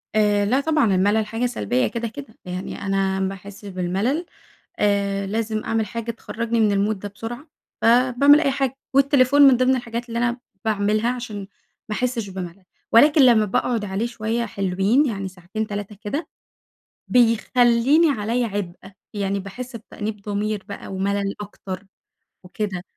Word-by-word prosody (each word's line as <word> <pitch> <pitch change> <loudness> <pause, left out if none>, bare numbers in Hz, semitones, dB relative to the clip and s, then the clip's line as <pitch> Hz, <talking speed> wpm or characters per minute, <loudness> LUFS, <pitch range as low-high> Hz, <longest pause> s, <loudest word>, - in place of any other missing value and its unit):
آآ 205 -1 +3
لا 255 +6 +2
طبعًا 285 -10 +2
المَلل 205 +3 +2
حاجة 225 +3 -2
سلبيّة 125 - 0
كده 235 0 -3
كده؛ 230 0 -10
يعني 180 +2 -5
أنا 195 -1 0
باحس 195 +1 -5
بالملل 195 - -1 0.5
آآ 200 -1 +1
لازم 215 +1 -2
أعمل 225 -1 0
حاجة 230 +1 -4
تخرجني 230 +1 -3
من 215 -2 +4
المود 200 +1 0
ده 205 - -6
بسرعة، 235 +8 -8 0.3
فباعمل 255 +5 +5
أي 275 - +2
حاجة 270 -1 -1 0.2
والتليفون 275 0 +4
من 270 -3 +8
ضمن 255 +1 +3
الحاجات 240 -1 -4
اللي 230 - -2
أنا 240 +1 0 0.3
باعملها 215 +2 +1
عشان 225 -4 -6 0.5
ما 210 - -2
أحسش 240 -5 -2
بمَلل. 185 0 -7 0.3
ولكن 290 +6 +6
لمّا 235 -4 +6
باقعد 220 +2 0
عليه 195 +4 -2
شويّة 235 0 -2
حلوين، 200 +7 +1
يعني 195 -6 -3
ساعتين، 185 +4 -5
3 205 0 -5
كده 255 +10 -3 0.8
بيخليني 245 +5 +4
عليَّ 235 +4 0
عبْء، 195 -2 -5 0.2
يعني 200 -1 -1
باحس 240 +6 -8
بتأنيب 210 -2 -6
ضمير 205 0 -2
بقى 200 - -7
وملل 200 +1 -1
أكتر 195 -2 -7 0.6
وكده، 185 -1 -4
215 Hz, 145 wpm, -22 LUFS, 200-240 Hz, 0.8 s, من